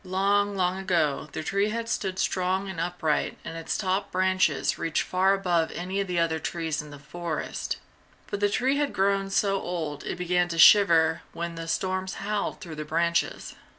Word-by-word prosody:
Long, 200 +2 +1
long 185 0 +1
ago, 165 -6 0
the - - -5
tree 200 +5 +1
had 230 +1 -3
stood 195 -4 -2
strong 190 +1 0
and 190 -4 -6
upright 165 -3 -1
and 165 - -6
its 165 0 -3
top 195 0 -1
branches 185 -5 +1
reached 165 -1 0
far 190 +2 +2
above 175 -4 +1
any 185 +3 -3
of 195 - -3
the 180 -1 -2
other 165 -1 +1
trees 160 -3 -2
in 150 - -11
the 145 - -10
forest, 155 +2 -4 0.5
but 205 - -4
the 205 0 +2
tree 260 +6 +1
had 290 -1 0
grown 195 0 +1
so 195 -1 +1
old 160 -5 -4
it - - -3
began 180 0 +1
to 170 -1 -4
shiver 165 -3 +6
when 170 0 -4
the 165 0 -6
storms 185 +2 -1
howled 205 +1 -2
through 160 -3 -8
the 155 - -3
branches. 170 +2 -1
180 Hz, 185 wpm, -26 LUFS, 165-195 Hz, 0.5 s, shiver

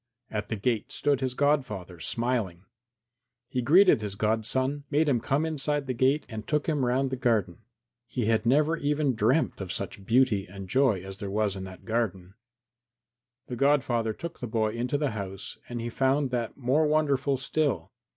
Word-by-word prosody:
At 105 -1 -3
the 110 - -1
gate 110 +1 -1
stood 140 -2 +1
his 130 -1 -1
godfather, 115 - 0
smiling. 110 -4 -2 0.8
He 125 - -2
greeted 170 - +6
his 105 -2 -4
godson, 120 +7 0
made 150 +2 +2
him 130 -5 +3
come 140 +7 0
inside 145 -2 -1
the 130 - -2
gate 130 +5 +2
and 110 -2 -7
took 150 -1 0
him 150 -4 0
round 130 +2 +1
the - - 0
garden. 115 -9 0 0.5
He 120 0 -2
had 110 0 +2
never 150 +7 +3
even 145 -2 +1
dreamt 115 +3 +1
of 95 -1 -5
such 100 0 -5
beauty 110 -2 +2
and 95 +1 -9
joy 125 -5 +2
as 95 0 -9
there 100 - -4
was 105 0 0
in 95 -1 -6
that 95 -1 -11
garden. 100 -5 -2 1.1
The 125 - -5
godfather 125 -4 +2
took 170 +8 -7
the 125 - -4
boy 110 -1 0
into 120 +5 -1
the 145 -2 0
house 100 -2 -6
and 120 -1 -4
he 115 - -3
found 135 +2 +1
that 120 -2 -2
more 140 +4 +2
wonderful 140 -3 +2
still. 140 +1 -1
125 Hz, 180 wpm, -28 LUFS, 105-140 Hz, 1.1 s, greeted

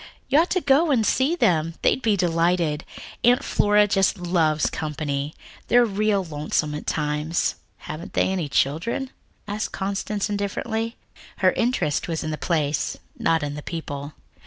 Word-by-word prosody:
You 280 - +5
ought 340 - +2
to 370 - +1
go 285 +4 +4
and 240 -6 +3
see 270 +10 +2
them, 165 - +2
they'd - - +3
be 220 -4 +2
delighted. 170 -3 +1 0.4
Aunt 245 +1 +4
Flora 210 0 +3
just 195 -1 +2
loves 160 -6 +1
company. 150 -1 -3 0.3
They're 245 0 +5
real 210 -1 +1
lonesome 150 -1 -1
by 150 - -3
times." 150 +2 -1 0.2
"Haven't 155 +3 -8
they - - +2
any 175 -6 -2
children?" 175 - 0 0.4
asked 210 +1 -3
Constance 200 +1 -2
indifferently. 220 +3 -2 0.4
Her - - +4
interest 230 - 0
was 165 -2 -2
in 155 - -3
the 155 - -3
place, 150 -4 0 0.2
not 165 -2 +2
in 145 -1 -3
the 150 - -6
people. 145 -3 -6
175 Hz, 155 wpm, -24 LUFS, 155-215 Hz, 0.4 s, You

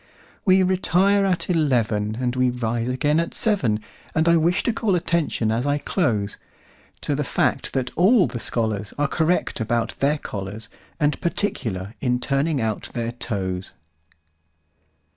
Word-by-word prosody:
We 190 -1 +5
retire 190 +2 +3
at 180 -2 0
eleven, 115 - +1
And 125 -1 -1
we 130 0 +3
rise 120 -1 -2
again 145 +5 +1
at 170 - -2
seven; 130 - +1 0.3
And 160 +1 +2
I 170 - +6
wish 170 +2 +2
to 235 - +1
call 215 -4 +1
attention, 165 -10 0
as 120 +5 0
I 145 0 +2
close, 115 - -1 0.6
To - - -1
the - - 0
fact - - 0
that 130 -2 -1
all 190 +3 +5
the 120 - -4
scholarsAre 110 +4 -1
correct 165 -2 +1
about 115 +1 0
their 145 +2 +2
collars, 105 -3 -6 0.3
And 150 -2 +1
particular 110 - -2
in 125 -1 +1
turning 140 +3 0
out 110 -3 -2
their 115 -1 -2
toes. 95 -6 -4
130 Hz, 145 wpm, -23 LUFS, 110-170 Hz, 0.6 s, I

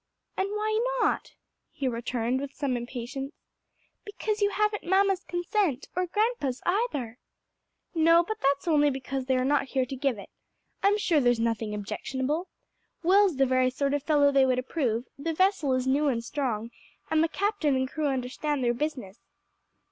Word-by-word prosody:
"And 385 +1 -1
why 430 +1 0 0.2
not?" - - 0 0.4
he 280 -4 -3
returned 240 +1 -1
with 280 -1 -6
some 275 -4 -1
impatience. 245 +3 -5 0.7
"Because 425 0 -3
you 405 - +4
haven't 425 0 0
mamma's 385 +1 +2
consent, 350 - -1
or 365 0 0
grandpa's 415 - 0
either." 295 - -1 0.7
"No, 330 +1 +5
but 435 +5 -5
that's 280 +3 +1
only 295 -3 +4
because 265 -1 -4
they 260 - +2
are 255 - +1
not 285 +1 +2
here 265 -1 0
to 270 - -6
give 265 -3 0
it. 200 - -11 0.5
I'm 405 +1 +4
sure 345 -7 +2
there's 245 -3 +3
nothing 225 -2 -1
objectionable. 260 - -3 0.6
Will's 385 0 +4
the 270 - +4
very 255 0 +3
sort 275 +2 -1
of 290 - 0
fellow 290 -1 +3
they 275 -1 +4
would 255 -1 +2
approve, 255 -3 -1
the 325 +2 -2
vessel 375 -6 +2
is 255 0 -1
new 280 +3 +2
and 235 -4 0
strong, 235 -4 -3 0.4
and 315 0 +4
the - - +3
captain 395 -7 0
and 260 0 0
crew 305 +2 -2
understand 270 +2 -2
their 240 0 +2
business." 250 -7 -4
280 Hz, 170 wpm, -27 LUFS, 255-350 Hz, 0.7 s, No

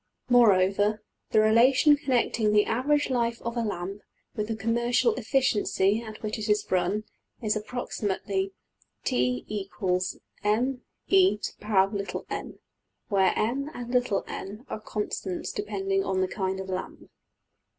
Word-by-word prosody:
} - - -53
\end{align*} 250 - 0
Moreover, 205 -2 +4 0.3
the 215 - +4
relation 255 +7 +5
connecting 245 -6 +1
the 210 0 +5
average 285 +4 +1
life 235 -2 0
of 235 +1 -3
a 235 - 0
lamp 200 -2 -4 0.3
with 210 -2 -2
the 225 - -2
commercial 235 - +2
efficiency 220 - +1
at 220 -1 -10
which 215 0 -3
it 215 0 -4
is 210 0 +2
run 185 +3 +1 0.4
is 215 -2 0
approximately 205 -3 -2 0.5
$t 125 0 0 0.3
= - - -23 0.6
mE^n$, 215 +5 +2 2.4
where 195 -3 +3
$m$~and~$n$ 245 -4 -2
are - - -3
constants 210 -3 -4
depending 390 -3 -1
on 190 - 0
the 185 - +2
kind 190 0 -2
of 190 - -5
lamp. 185 0 -6
215 Hz, 120 wpm, -27 LUFS, 200-245 Hz, 2.4 s, relation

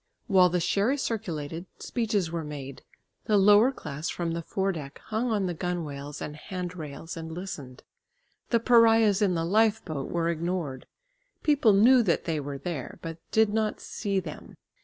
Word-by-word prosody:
While 185 -2 +5
the 180 +1 0
sherry 205 - +1
circulated, 170 - -4
speeches 210 -8 -1
were 170 -1 -3
made. 140 -3 -7 0.4
The 210 - +3
lower 205 +5 +6
class 150 - -5
from 170 -1 -2
the 170 0 -2
fore 195 +4 -1
deck 145 -6 -7
hung 225 +3 -2
on 210 -4 +1
the 180 - -1
gunwales 150 -5 -4
and 150 - -6
hand 180 +2 -6
rails 155 0 -7
and 160 -1 -6
listened. 160 -8 -7 0.7
The 235 - +3
pariahs 225 -3 +5
in 190 -4 +3
the 165 0 0
lifeboat 205 -7 +1
were 170 -1 0
ignored. 170 -5 -3 0.6
People 285 -8 +4
knew 240 +6 +6
that 185 -7 +1
they 160 -2 -1
were 140 -1 -5
there, 150 -4 -5
but 165 0 -6
did 220 -1 +3
not 215 -1 0
see 200 -3 -2
them. 165 -5 -9
180 Hz, 165 wpm, -27 LUFS, 160-215 Hz, 0.7 s, lower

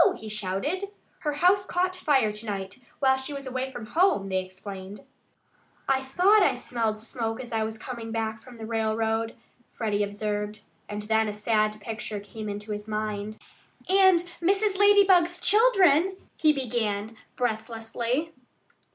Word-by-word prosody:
he 220 - -9
shouted. 215 - -2 0.3
"Her 300 -2 -1
house 360 +6 +4
caught 365 0 -1
fire 275 -11 +2
to 210 +2 -5
night, 195 +1 -4 0.2
while 265 -1 +3
she 265 +2 -5
was 275 -1 -6
away 260 +1 -3
from 240 -4 -7
home," 315 - +2
they 190 0 0
explained. 190 +1 -9 0.9
"I 270 -1 +2
thought 360 +11 +4
I - - +4
smelled 225 -3 -2
smoke 225 0 -4
as 245 -2 -7
I 220 -1 +1
was 220 0 -4
coming 230 0 -7
back 220 -1 -2
from 250 -2 -13
the 220 - -7
railroad," 225 0 -1 0.4
Freddie 210 -2 -1
observed. 210 +1 -3 0.3
And 210 0 -4
then 220 +1 +2
a 210 - -3
sad 215 0 +1
picture 215 0 -4
came 215 +1 -7
into 205 +1 -6
his 210 0 -5
mind. 215 0 -3 0.5
"And 375 -2 +5 0.2
Mrs. 395 +3 +2
Lady 410 0 +7
bug's 355 -2 +3
children 385 - +4
" - - -39
he 310 - +6
began 225 -5 -2 0.2
breathlessly. 235 +5 -2
225 Hz, 155 wpm, -27 LUFS, 215-300 Hz, 0.9 s, Lady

